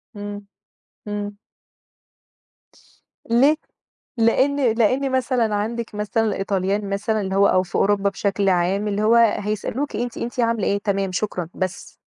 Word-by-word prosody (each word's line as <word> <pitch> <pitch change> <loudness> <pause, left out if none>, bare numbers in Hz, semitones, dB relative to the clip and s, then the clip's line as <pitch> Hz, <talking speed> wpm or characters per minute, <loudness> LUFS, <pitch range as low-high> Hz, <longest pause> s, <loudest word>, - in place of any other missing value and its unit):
إمم، 205 0 -7 0.6
إمم. 205 0 -4 1.9
ليه؟ 270 +6 +5 0.6
لإن 260 +2 +3
لإن 255 +4 +1
مثلًا 250 -4 +1
عندك 225 +1 -3
مثلًا 210 +2 0
الإيطاليين 195 0 -1
مثلًا 210 +2 -1
اللي 190 0 -3
هو 200 0 +5
أو 185 - +3
في 175 - -9
أوروبا 200 0 +2
بشكل 195 0 0
عام 190 +3 +1
اللي 205 0 -1
هو 225 +2 +4
هيسألوكِ 215 +4 +1
أنتِ 240 0 -3
أنتِ 240 +2 -5
عاملة 230 -3 +1
إيه، 200 - +2
تمام، 195 -1 0
شكرًا، 180 -4 -2
بس. 185 -1 -5
210 Hz, 135 wpm, -22 LUFS, 200-230 Hz, 1.9 s, ليه